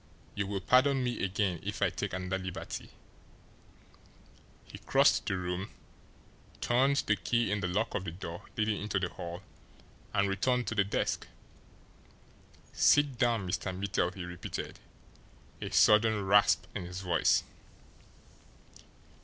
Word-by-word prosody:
You 100 -1 -2
will 100 -1 -3
pardon 130 +4 +4
me 120 -4 -2
again 95 -2 0
if - - -5
I - - +2
take - - -4
another 95 0 -3
liberty" 90 -1 -6 1.8
he - - -11
crossed - - +3
the 95 - 0
room, 90 +1 -3 0.9
turned 130 +4 +2
the 105 - +3
key 120 +1 0
in 105 - 0
the 95 - -1
lock 105 +6 -1
of 95 - -2
the 85 - -4
door 85 0 -7 0.2
leading 110 -1 0
into 105 -1 -1
the 90 -2 -1
hall, 85 +2 -7 0.7
and 100 0 +2
returned 120 +6 0
to - - -3
the 105 -2 +3
desk. 100 - -2 1.5
"Sit 145 -4 +4
down, 115 -6 +1
Mr. 90 +1 -3
Mittel!" 95 -2 0
he 90 -2 -6
repeated, 85 0 -6 0.8
a - - -4
sudden 105 -1 +4
rasp 100 +1 +4
in 90 - -4
his 90 +1 -6
voice. 85 -3 +2
100 Hz, 135 wpm, -31 LUFS, 90-110 Hz, 1.8 s, pardon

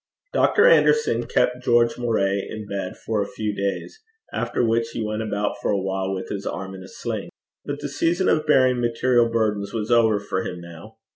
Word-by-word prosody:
Dr. 435 - +4
Anderson 460 -2 +4
kept 125 0 +1
George 120 -1 +3
Moray 100 -5 0
in 110 -1 -6
bed 100 -2 -5
for 110 -2 -2
a - - -2
few 105 -1 -3
days, 100 - -3 0.3
after - - -1
which 115 0 +1
he 115 - -2
went 105 +1 -2
about 105 -1 -2
for - - -1
a 100 - +2
while 95 0 -2
with 95 -1 -4
his 100 -1 -4
arm 95 0 -5
in 95 - -9
a 95 - -10
sling. - - -5 0.4
But - - -4
the - - -3
season 175 +3 0
of 155 0 +2
bearing 130 -4 +4
material 120 0 +2
burdens 105 -3 -1
was 110 +1 -2
over 110 -3 +4
for 100 -2 -3
him 90 - -5
now. 85 +6 -12
110 Hz, 200 wpm, -23 LUFS, 100-120 Hz, 0.4 s, Dr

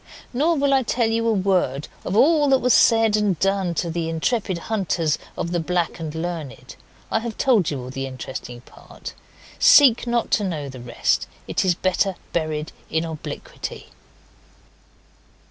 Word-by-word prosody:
Nor 310 +6 +2
will 280 0 +2
I 270 - +4
tell 235 -2 0
you 230 0 0
a - - +3
word 185 -9 0 0.2
of 185 - -3
all 295 +2 +4
that 270 - +5
was 250 -1 +2
said 225 -2 +5
and 205 -4 +1
done 195 -1 0
to 170 +1 -1
the 165 0 -2
intrepid 185 +3 -1
hunters 170 -5 -1 0.2
of 170 - -3
the 175 - 0
Black 175 +1 -1
and 160 -1 -5
Learned. 160 -7 -6 0.4
I - - +2
have 225 -1 -6
told 225 - +3
you 145 - -3
all 125 - -7
the 135 0 -4
interesting 130 -2 -7
part. - - -12 0.5
Seek 280 - +6
not 235 0 0
to 210 - +2
know 155 -7 -3
the 130 -2 -9
rest. 120 0 0 0.2
It - - 0
is 180 -2 +2
better 185 +1 0 0.2
buried 155 -2 -2 0.2
in 160 +1 0
obliquity. 160 -2 -7
180 Hz, 165 wpm, -22 LUFS, 160-230 Hz, 0.5 s, Seek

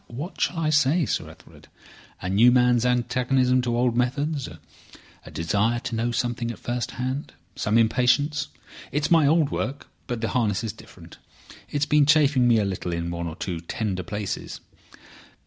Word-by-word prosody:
"What 145 +10 -7
shall 175 - 0
I 155 -2 0
say, 150 +2 +3
Sir - - -2
Ethelred? - - -17 0.6
A - - -2
new 105 +6 +5
man's 125 -1 +3
antagonism 125 +1 +2
to 120 -1 -1
old 120 -1 +1
methods. 140 +3 -1 0.8
A - - -8
desire 105 +9 0
to 120 - -4
know 115 +2 0
something 120 0 -2
at 115 - -6
first 120 0 -3
hand. 130 +3 -3 0.2
Some 110 0 +1
impatience. 130 +6 +2 0.4
It's 150 +4 -1
my 160 -4 +5
old 155 -1 +3
work, 140 +2 -4 0.2
but 120 -2 -3
the 115 - -1
harness 110 -4 0
is 110 - -3
different. - - -15 0.5
It - - -19
has - - +2
been 150 -2 +3
chafing 145 -5 +4
me 120 -1 +5
a 105 - +1
little 95 -2 -3
in 85 0 -3
one 85 0 -4
or 80 - -6
two 90 -2 -4
tender 95 +2 -3
places." 105 +3 -5
125 Hz, 175 wpm, -24 LUFS, 110-140 Hz, 0.8 s, new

